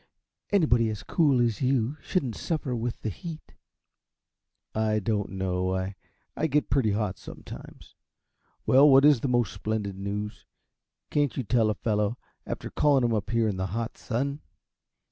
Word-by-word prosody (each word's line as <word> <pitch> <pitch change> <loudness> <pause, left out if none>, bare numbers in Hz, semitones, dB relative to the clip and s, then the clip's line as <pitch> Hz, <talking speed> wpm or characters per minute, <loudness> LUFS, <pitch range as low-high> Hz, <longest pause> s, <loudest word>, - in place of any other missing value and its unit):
Anybody 125 - +3
as 105 -2 -5
cool 145 -7 +3
as 115 -3 +1
you 130 -2 +2
are 150 0 -14
shouldn't 135 - -1
suffer 150 -6 -2
with 120 0 -3
the 110 - -1
heat." 160 - -9 1.2
"I 110 0 +1
don't 105 0 -1
know 95 -1 -1 0.6
I 160 - 0
get 145 -6 0
pretty 120 -6 +3
hot, 105 -2 -2
sometimes. - - -11 0.7
Well, 140 +3 +7
what 135 +1 +7
is 145 -4 +6
the 135 - -1
most 120 -3 +1
splendid 105 -1 -3
news? 105 +2 -5 0.6
Can't 145 -5 +1
you 130 - 0
tell 115 0 +2
a 105 - 0
fellow, 105 +2 0 0.3
after - - -5
calling 140 -3 +3
him 120 -1 +2
up 105 -1 -1
here 115 -1 +2
in 100 -3 -1
the 95 0 -1
hot 115 0 -3
sun?" 140 +5 -2
115 Hz, 160 wpm, -27 LUFS, 105-135 Hz, 1.2 s, Well